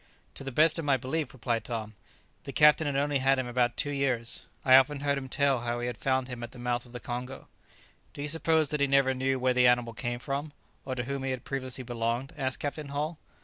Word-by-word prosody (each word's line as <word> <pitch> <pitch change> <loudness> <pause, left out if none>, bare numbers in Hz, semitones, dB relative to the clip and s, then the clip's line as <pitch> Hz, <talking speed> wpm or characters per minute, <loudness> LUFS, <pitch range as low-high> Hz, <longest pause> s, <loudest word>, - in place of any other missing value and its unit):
"To - - -9
the 135 - -5
best 155 +5 +4
of 165 - -3
my 140 -2 +3
belief," 135 +3 -3
replied 120 -2 -2
Tom, 110 -3 -5 0.5
"the 140 - -5
captain 150 +1 +5
had 140 - -1
only 140 0 +1
had 135 +1 +3
him 130 - -1
about 120 0 0
two 145 - 0
years. 130 -5 -1 0.2
I 130 -1 +8
often 140 +2 +4
heard 140 0 +1
him 135 -1 -5
tell 140 -1 +2
how 120 0 -2
he 120 0 -2
found 130 +2 0
him 125 -2 -6
at 120 -1 -7
the - - -12
mouth 120 0 -2
of - - -16
the 125 - -7
Congo." 125 +2 -6 0.7
"Do 145 - -5
you - - -2
suppose 160 -1 +2
that 150 -1 -1
he 140 - +4
never 135 -1 +3
knew 130 +1 0
where 130 0 +2
the 125 0 +5
animal 125 -1 +2
came 120 +1 -3
from, 140 +4 -4 0.3
or 130 -1 -3
to 125 - -2
whom 140 +2 -3
he 135 - -2
had 130 -2 -3
previously 130 -1 -3
belonged?" 120 +4 -2
asked 130 -3 -1
Captain 145 +1 -4
Hull. 150 +3 -3
130 Hz, 240 wpm, -29 LUFS, 125-140 Hz, 0.7 s, I